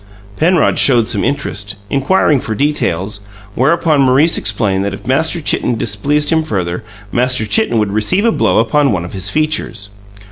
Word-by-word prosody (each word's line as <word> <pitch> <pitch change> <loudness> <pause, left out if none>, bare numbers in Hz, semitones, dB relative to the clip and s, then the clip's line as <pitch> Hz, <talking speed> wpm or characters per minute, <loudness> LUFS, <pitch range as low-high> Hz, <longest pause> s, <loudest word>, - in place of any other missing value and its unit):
Penrod 170 - +2
showed 120 -5 +3
some 120 - 0
interest, 105 -8 -3 0.2
inquiring 140 +1 +2
for 110 -2 -4
details, 105 - -1 0.3
whereupon 155 +2 +2
Maurice 135 +5 +3
explained 100 -2 0
that 100 -1 -3
if - - -15
Master 160 +6 0
Chitten 125 -4 0
displeased 145 +9 -1
him 160 -1 +2
further, 90 - -3 0.3
Master 125 -2 +1
Chitten 220 - +1
would 105 -2 0
receive 175 - +1
a 230 - +3
blow - - +1
upon 135 +5 +2
one 85 -4 -2
of 90 - -10
his 95 0 -1
features. 150 -8 -2
125 Hz, 165 wpm, -14 LUFS, 105-150 Hz, 0.3 s, showed